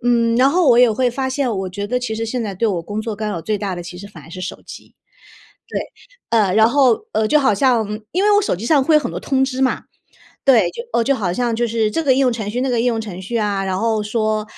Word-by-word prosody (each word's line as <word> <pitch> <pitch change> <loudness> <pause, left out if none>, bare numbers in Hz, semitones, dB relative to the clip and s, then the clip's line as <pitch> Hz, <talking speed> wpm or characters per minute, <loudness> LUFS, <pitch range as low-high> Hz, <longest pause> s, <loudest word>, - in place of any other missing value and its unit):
嗯， 235 -1 +2
然 260 +2 +5
后 350 +2 +2
我 235 - +5
也 245 -1 +6
会 245 +3 +1
发 260 +2 -2
现， 260 -3 -1
我 190 -1 -3
觉 200 +2 -5
得 250 +4 -1
其 235 -3 -3
实 225 +1 -3
现 240 +2 -3
在 205 -3 -4
对 230 +5 0
我 185 -6 -1
工 205 +5 -5
作 225 -1 -4
干 215 +1 -4
扰 175 -6 -4
最 210 +2 -2
大 195 -3 -3
的 175 - -6
其 180 +1 -9
实 200 +2 -9
反 165 -8 -14
而 165 - -15
是 185 - -8
手 185 - -6
机。 - - -12 0.7
对， - - -3 0.5
呃， 215 -5 +3
然 220 +1 +5
后， 270 - +2
呃， 215 0 +1
就 300 - +4
好 265 -7 +2
像 235 -1 +2 0.2
因 370 +7 0
为 420 - +4
我 410 - +4
手 375 - -1
机 220 - -6
上 285 0 +4
会 310 +3 +4
有 - - +4
很 - - -3
多 - - -6
通 265 -1 +1
知 265 0 -2
嘛。 260 - 0 0.6
对， 230 -10 +4
就 470 - -7
呃， 235 - +2
就 275 - +2
好 195 -8 -2
像 240 +3 -1
就 240 +1 0
是 225 -1 0
这 325 - -1
个 275 -4 +3
应 260 - 0
用 255 -2 +3
程 215 -3 -4
序、 245 +4 -3
那 265 - 0
个 240 -2 +1
应 245 - 0
用 235 -2 +1
程 200 -5 -7
序 200 +6 -4
啊， 205 -3 0
然 190 -1 -2
后 220 0 0
说， 215 0 -1
230 Hz, 315 characters per minute, -19 LUFS, 205-255 Hz, 0.7 s, 也